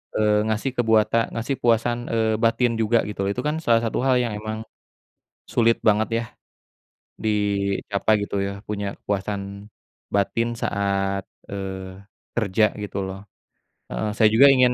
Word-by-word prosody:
eee, 105 0 +3
ngasih 110 +5 -1
kebuata 110 -1 +3 0.2
ngasih 120 +4 -2
kepuasan, 120 0 +2
eee, 110 -1 +1
batin 115 +1 +3
juga 115 +2 +3
gitu 105 - -8
loh. - - 0
Itu 125 - -3
kan 150 - 0
salah 115 -1 +4
satu 115 - -1
hal 130 -1 +4
yang 115 -3 -2
emang 110 0 -4 0.9
sulit 115 -1 +4
banget 110 +2 +3
ya - - -3 1.0
dicapai 100 0 +1
gitu 100 - -4
ya, 100 - -3 0.2
punya 105 -1 -2 0.2
kepuasan 100 0 -3 0.5
batin 115 +4 +1
saat, 100 -1 0 0.3
eee, 95 -1 -6 0.3
kerja 110 -2 +2 0.2
gitu 100 - -4
loh. 95 0 -6 0.7
Heeh, 110 - -2
saya 110 -2 +6
juga 135 +5 +8
ingin 125 -1 +4
110 Hz, 145 wpm, -23 LUFS, 100-115 Hz, 1.0 s, juga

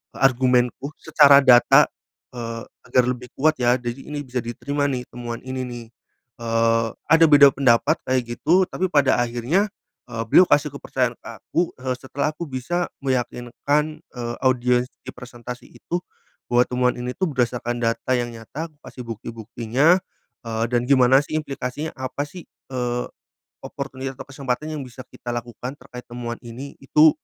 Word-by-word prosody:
e - - -9
argumenku 130 0 +2
secara 145 -3 +7
data, 120 -1 +7 0.5
eee, 115 -1 -5 0.3
agar 125 +1 +4
lebih 125 0 -3
kuat 155 +3 +4
ya. 120 0 +4
Jadi 120 +1 -5
ini 145 -1 -4
bisa 125 -1 -3
diterima 140 +5 -2
nih 125 -2 -2
temuan 120 -1 -5
ini 130 0 -3
nih. 120 -2 -7 0.5
Eee, 115 0 +1 0.2
ada 165 +2 +6
beda 145 -1 +9
pendapat 125 -4 +4
kayak 125 -2 -1
gitu 180 +7 +3
tapi 185 -1 -2
pada 140 -3 +4
akhirnya, 130 - 0 0.4
eee, 115 0 -2
beliau 180 - +7
kasih 150 -4 +3
kepercayaan 125 -3 -1
ke - - -15
aku, 170 - -1
eee, 130 0 -2
setelah 140 +4 -3
aku - - -5
bisa 155 +7 -2
meyakinkan, 140 +4 -1
eee, 120 -1 -6
audiens 125 -1 +2 0.2
di - - -4
presentasi 125 0 -9
itu, 175 +9 -4 0.5
bahwa 120 0 +5
temuan 125 0 +1
ini 125 +1 -4
tuh 185 -4 -1
berdasarkan 120 -2 -1
data 115 +2 -1
yang 120 -1 -1
nyata, 140 +9 -6
kukasih 145 -3 -11
bukti-buktinya, 115 - +1 0.5
eee, 115 -1 -2
dan 120 0 +2
gimana 130 +1 +5
sih 155 - -5
implikasinya, 140 +1 -5
apa 130 +2 -4
sih, 175 +3 -10 0.3
eee, 125 -1 -2 0.6
opportunity 135 -1 -6
atau 130 - -8
kesempatan 140 +1 -3
yang 140 - -4
bisa 125 +1 -10
kita 120 -1 -6
lakukan 120 +2 -6
terkait 125 -3 -12
temuan 120 -1 -6
ini, 130 +5 -8
itu 150 +3 +5
125 Hz, 155 wpm, -23 LUFS, 120-140 Hz, 0.6 s, beda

